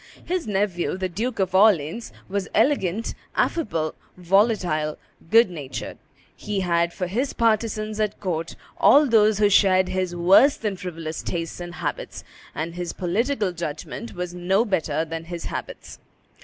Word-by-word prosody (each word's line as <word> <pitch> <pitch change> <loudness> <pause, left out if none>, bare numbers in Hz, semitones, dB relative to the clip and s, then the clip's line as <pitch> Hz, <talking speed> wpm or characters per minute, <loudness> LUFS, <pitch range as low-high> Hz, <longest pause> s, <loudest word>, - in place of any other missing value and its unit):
His 360 -4 -2
nephew, 195 -3 -1
the 190 0 -1
Duke 220 +7 -3
of 190 -2 0
Orleans, 190 0 +3 0.2
was 200 0 -2
elegant, 220 -4 +1 0.2
affable, 165 - 0 0.2
volatile, 180 -5 +1 0.3
good 225 -3 +5
natured; 145 -6 -6 0.4
he 205 -2 -3
had 170 -1 +1
for 180 - -3
his 240 +10 -2
partisans 215 -1 0
at 210 -1 -1
court 170 -4 -3 0.2
all 295 +2 +6
those 215 -4 +4
who 210 0 +4
shared 185 -2 +4
his 185 -2 -2
worse 195 +12 +5
than 210 -3 -2
frivolous 165 -3 -6
tastes 165 -1 -4
and 175 0 -7
habits; - - -5 0.3
and 165 +2 -3
his 175 -1 -4
political 210 +3 0
judgment 170 +6 -6
was 180 0 -4
no 190 +5 +1
better 160 -6 0
than 165 0 -6
his 170 0 -6
habits. - - -7
185 Hz, 145 wpm, -24 LUFS, 170-215 Hz, 0.4 s, all